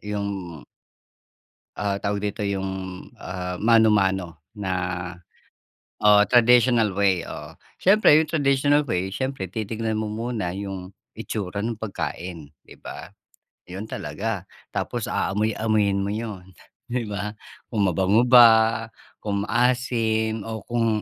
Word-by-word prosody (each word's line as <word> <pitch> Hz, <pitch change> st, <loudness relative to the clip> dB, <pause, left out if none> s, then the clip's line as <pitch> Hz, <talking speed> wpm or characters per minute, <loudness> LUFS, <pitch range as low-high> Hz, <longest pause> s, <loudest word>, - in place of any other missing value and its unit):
yung 100 Hz, -6 st, -5 dB, 1.2 s
ah, 100 Hz, -1 st, -1 dB
tawag 100 Hz, 0 st, -2 dB
dito 105 Hz, -, -8 dB
yung, 95 Hz, -1 st, -2 dB, 0.5 s
ah, 90 Hz, -1 st, -5 dB
mano-mano 95 Hz, -7 st, +3 dB, 0.2 s
na, 95 Hz, -2 st, -2 dB, 1.3 s
o 105 Hz, 0 st, +7 dB
traditional 120 Hz, -3 st, +4 dB
way, 95 Hz, -2 st, +2 dB
oo. -, -, -8 dB, 0.2 s
Siyempre 195 Hz, -5 st, +6 dB
yung 155 Hz, -1 st, +1 dB
traditional 145 Hz, -1 st, +2 dB
way 95 Hz, -7 st, -1 dB
siyempre 130 Hz, -6 st, -3 dB
titignan 110 Hz, +3 st, -3 dB
mo 105 Hz, -, -4 dB
muna 110 Hz, -4 st, -3 dB
yung 95 Hz, -2 st, -6 dB, 0.3 s
itsura 100 Hz, -1 st, -4 dB
nung 115 Hz, 0 st, -3 dB
pagkain 90 Hz, -7 st, -5 dB, 0.2 s
'di -, -, -13 dB
ba? -, -, -8 dB, 0.6 s
Yun 95 Hz, +4 st, -6 dB
talaga, 100 Hz, +4 st, -4 dB, 0.3 s
tapos -, -, -2 dB
aamoy-amuyin 105 Hz, -1 st, 0 dB
mo 100 Hz, -, -2 dB
yun, 105 Hz, -4 st, -5 dB, 0.5 s
'di 120 Hz, -3 st, -1 dB
ba 105 Hz, 0 st, -4 dB, 0.4 s
kung 105 Hz, -4 st, +2 dB
mabango 95 Hz, +7 st, +3 dB
ba, 115 Hz, -2 st, +6 dB, 0.4 s
kung 100 Hz, -1 st, -2 dB
maasim 115 Hz, -2 st, +1 dB
o 110 Hz, 0 st, -5 dB
kung 115 Hz, -2 st, +1 dB
105 Hz, 115 wpm, -24 LUFS, 95-115 Hz, 1.3 s, o